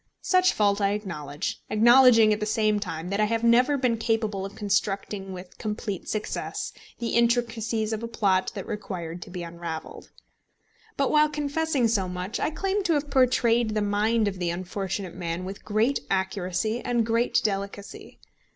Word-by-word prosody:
Such 370 Hz, -1 st, +4 dB
fault 205 Hz, -1 st, +2 dB
I 200 Hz, 0 st, +2 dB
acknowledge, 155 Hz, -7 st, -4 dB
acknowledging 230 Hz, 0 st, +6 dB
at 210 Hz, -, -2 dB
the 210 Hz, -, -2 dB
same 215 Hz, -1 st, +2 dB
time 175 Hz, -4 st, -5 dB
that 200 Hz, +1 st, -1 dB
I 215 Hz, -, +4 dB
have 225 Hz, +1 st, -1 dB
never 250 Hz, +5 st, +4 dB
been 250 Hz, -3 st, +1 dB
capable 220 Hz, -3 st, -1 dB
of 195 Hz, -, -14 dB
constructing 200 Hz, -1 st, -1 dB
with 180 Hz, 0 st, -10 dB
complete 210 Hz, -3 st, -4 dB
success 215 Hz, -1 st, -3 dB, 0.2 s
the 235 Hz, -, -3 dB
intricacies 230 Hz, -2 st, +1 dB
of 220 Hz, -, -3 dB
a 230 Hz, -, -4 dB
plot 195 Hz, -5 st, +1 dB
that 195 Hz, -, -5 dB
required 180 Hz, -5 st, -5 dB
to -, -, -9 dB
be 180 Hz, -1 st, -6 dB
unravelled. 170 Hz, -1 st, -7 dB, 0.9 s
But 275 Hz, -, +1 dB
while 305 Hz, 0 st, +5 dB
confessing 295 Hz, -3 st, 0 dB
so 200 Hz, -5 st, 0 dB
much, 180 Hz, +3 st, -4 dB
I -, -, +1 dB
claim 390 Hz, +5 st, -1 dB
to 340 Hz, -, +3 dB
have 290 Hz, -1 st, -1 dB
portrayed 240 Hz, -4 st, +3 dB
the 215 Hz, -, +1 dB
mind 210 Hz, +2 st, +1 dB
of 190 Hz, -2 st, -3 dB
the 175 Hz, -1 st, -1 dB
unfortunate 185 Hz, +1 st, -4 dB
man 175 Hz, 0 st, -4 dB
with 195 Hz, +1 st, -7 dB
great 220 Hz, +6 st, +1 dB
accuracy 190 Hz, +4 st, -1 dB
and 240 Hz, -2 st, +1 dB
great 230 Hz, +2 st, +2 dB
delicacy. 200 Hz, -1 st, -4 dB
215 Hz, 170 wpm, -26 LUFS, 190-235 Hz, 0.9 s, acknowledging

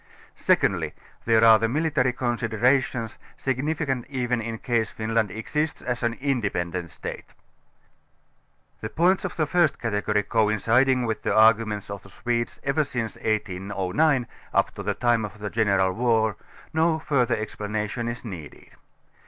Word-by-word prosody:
Secondly -, -, +1 dB, 0.3 s
there 115 Hz, -1 st, +4 dB
are 110 Hz, -1 st, +8 dB
the 115 Hz, -, +1 dB
military 145 Hz, -2 st, +1 dB
considerations, 120 Hz, 0 st, 0 dB, 0.2 s
signifi 145 Hz, +4 st, -1 dB
cant 130 Hz, -4 st, -2 dB
even 125 Hz, -3 st, -1 dB
in 115 Hz, 0 st, -4 dB
case 115 Hz, -1 st, 0 dB
Finland 110 Hz, -1 st, -1 dB
exists 150 Hz, -, -2 dB
as 125 Hz, -1 st, -2 dB
an 120 Hz, -1 st, 0 dB
independent 100 Hz, -11 st, -2 dB
State. -, -, -8 dB, 1.4 s
The 110 Hz, -, -5 dB
points 180 Hz, -, +2 dB
of -, -, -3 dB
view 160 Hz, -, 0 dB
of 150 Hz, -, -3 dB
the 180 Hz, -, -2 dB
first 160 Hz, -5 st, +4 dB
category 105 Hz, -2 st, 0 dB
coinciding 115 Hz, +4 st, +2 dB
with 110 Hz, -2 st, -2 dB
the -, -, 0 dB
arguments 110 Hz, -2 st, +3 dB
of 100 Hz, -2 st, -6 dB
the 100 Hz, -, -16 dB
Swedes 120 Hz, +4 st, -2 dB
ever 140 Hz, +3 st, +2 dB
since 120 Hz, -5 st, -4 dB
1809 105 Hz, +6 st, 0 dB, 0.3 s
up -, -, +2 dB
to -, -, -7 dB
the -, -, -2 dB
time 120 Hz, -2 st, +2 dB
of 105 Hz, 0 st, -6 dB
the 105 Hz, -1 st, -5 dB
general 100 Hz, -4 st, +2 dB
war, 110 Hz, -1 st, +2 dB, 0.4 s
no 160 Hz, 0 st, +2 dB
further 130 Hz, -6 st, +1 dB
explanation 105 Hz, +2 st, -3 dB
is 120 Hz, +1 st, -5 dB
needed. 85 Hz, -9 st, -9 dB
115 Hz, 150 wpm, -25 LUFS, 105-130 Hz, 1.4 s, are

